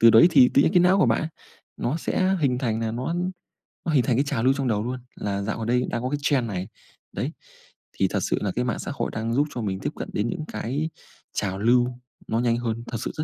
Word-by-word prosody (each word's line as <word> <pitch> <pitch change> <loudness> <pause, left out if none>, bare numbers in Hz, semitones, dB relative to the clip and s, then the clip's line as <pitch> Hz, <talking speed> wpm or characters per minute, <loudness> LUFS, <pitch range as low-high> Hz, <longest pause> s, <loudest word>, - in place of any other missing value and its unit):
Từ 115 0 +9
đấy 115 +9 +8
thì 135 -6 +7
tự 140 - +7
nhiên - - +2
cái 180 - +6
não 185 +3 +5
của - - +5
bạn, 160 - +1 0.5
nó 135 +7 -1
sẽ 185 +3 +1
hình 125 -4 +2
thành 115 -4 -1
là 115 -1 -1
nó 130 +8 -2 0.7
nó 160 - 0
hình 130 -4 +4
thành 125 - +2
cái 135 - +3
trào 140 -5 -1
lưu 130 +1 +5
trong 135 -2 -2
đầu 105 -2 +1
luôn, 125 +2 -3 0.2
là 100 -1 -2
dạo 105 +3 -2
gần 115 0 -4
đây 125 +1 +2
đang 120 - -2
có 130 - 0
cái 145 - 0
trend 135 -5 +2
này. 95 -2 -3 0.4
Đấy, - - -3 0.6
thì - - +1
thật - - 0
sự - - +1
là 100 -3 0
cái 125 +1 0
mạng 115 - -1
xã - - -4
hội - - -2
đang 115 +1 -2
giúp 145 +4 +2
cho 120 - -2
mình 95 -3 -2
tiếp - - -2
cận - - -6
đến 105 +3 0
những 155 -4 -4
cái 145 +7 -2 0.4
trào 95 -2 -2
lưu 120 +3 +4 0.4
nó 115 - 0
nhanh 120 -1 +2
hơn 115 -1 -2
thật 120 - -3
sự - - -3
rất 155 - -1
120 Hz, 270 wpm, -25 LUFS, 110-140 Hz, 0.7 s, Từ